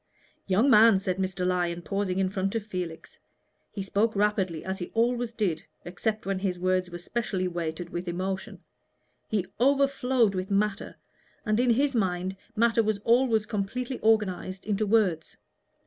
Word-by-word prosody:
"Young 200 +7 +3
man," 225 -5 +7
said 190 -1 -2
Mr. 190 -1 -2
Lyon, 175 -1 0
pausing 195 -1 -2
in 190 -1 +1
front 195 +1 -2
of 220 -2 -2
Felix. 180 -5 -6 0.5
He 200 - -4
spoke 210 +3 0
rapidly, 195 -5 0
as 190 0 -3
he 175 - -5
always 240 +1 +1
did, 200 -8 -1 0.2
except 215 +5 -3
when 195 -1 -1
his 190 -2 -1
words 185 0 0
were 175 - -6
specially 190 0 -2
weighted 170 0 -4
with 175 +1 -4
emotion: 190 +2 -4 0.7
he 205 -4 -1
overflowed 265 -4 +3
with 185 +1 -3
matter, 200 0 -1 0.5
and 215 +1 +1
in 250 0 +3
his 275 +4 +3
mind 190 -4 -1 0.2
matter 230 +1 +3
was 215 -1 0
always 230 -2 +3
completely 235 +4 -3
organized 195 -4 0
into 210 0 0
words. 195 -7 +1
195 Hz, 155 wpm, -27 LUFS, 185-225 Hz, 0.7 s, man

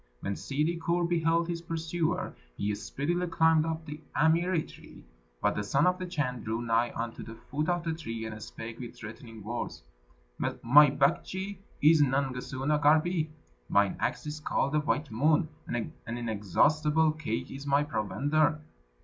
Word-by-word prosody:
When 100 - -2
Ssidi 150 - -1
Kur 170 +2 +1
beheld 165 0 +2
his 170 -1 -3
pursuer, 165 +1 -2 0.2
he 105 +1 0
speedily 155 - -2
climbed 160 -1 +3
up 160 0 -3
the 150 0 -7
amiri 165 +2 +2
tree, - - -14 0.4
but - - +2
the 105 - -1
Son 135 +8 +2
of 180 +1 +2
the 185 - -4
Chan 130 -8 -2
drew 110 +1 -2
nigh 115 +1 +2
unto 115 0 -4
the 115 - -8
foot 150 +7 -3
of 175 -1 0
the 165 -1 -1
tree, 115 -8 -5
and 110 -1 -6
spake 115 +2 -8
with 120 -2 -7
threatening 115 0 -10
words: 120 +3 -5 0.6
"My 145 +5 +5
Baktschi 185 +8 0 0.2
is 155 0 +7
Nangasuna 135 +1 0
Garbi; 155 +2 +3 0.4
mine 100 -1 +3
axe - - -1
is 150 +1 -5
called 140 -2 0
the 150 - +2
white 150 -2 -1
moon; 150 +7 +3 0.2
an 120 -2 -3
inexhaustible 145 - +2
cake 130 -5 -4
is 140 +1 -7
my 140 +1 +3
provender. 145 - +1
150 Hz, 160 wpm, -29 LUFS, 120-160 Hz, 0.6 s, is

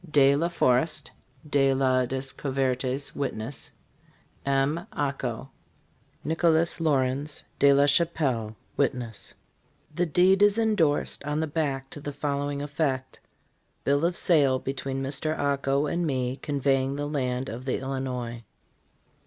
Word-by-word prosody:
"Ds 140 -2 +5
LA 170 - +1
FOREST. 155 -2 +1 0.4
DE 135 -2 +3
LA 130 -1 +2
DESCOUVERTES, 135 0 -2
Witness. 130 -2 -3 0.8
"M. 140 +7 +1
Aco. 135 -3 -3 0.7
NICOLAS 165 +1 +2
LAURENS, 140 -1 0 0.2
DE 140 0 +6
LA 140 +1 +5
CHAPELLE, 140 -8 +1 0.2
Witness." 120 -7 -1 0.6
The 175 +2 0
deed 185 +5 +4
is 205 +1 +5
indorsed 205 -14 +2
on 150 +1 -2
the 160 - +1
back 140 -4 -2
to 145 - -8
the 145 - -4
following 145 0 -2
effect: 140 -3 -2 0.2
' - - -42
' - - -44
Bill 140 +2 +2
of 170 +1 +1
sale 140 -6 +3
between 135 0 -3
Mr. 145 +3 -1
Ako 140 0 +1
and 170 +3 -1
me 130 -2 -1
conveying 135 -2 0
the 145 0 -3
land 130 -3 -2
of 125 +2 -6
the 130 - 0
Illinois." 125 -3 -4
140 Hz, 130 wpm, -27 LUFS, 130-150 Hz, 0.8 s, DE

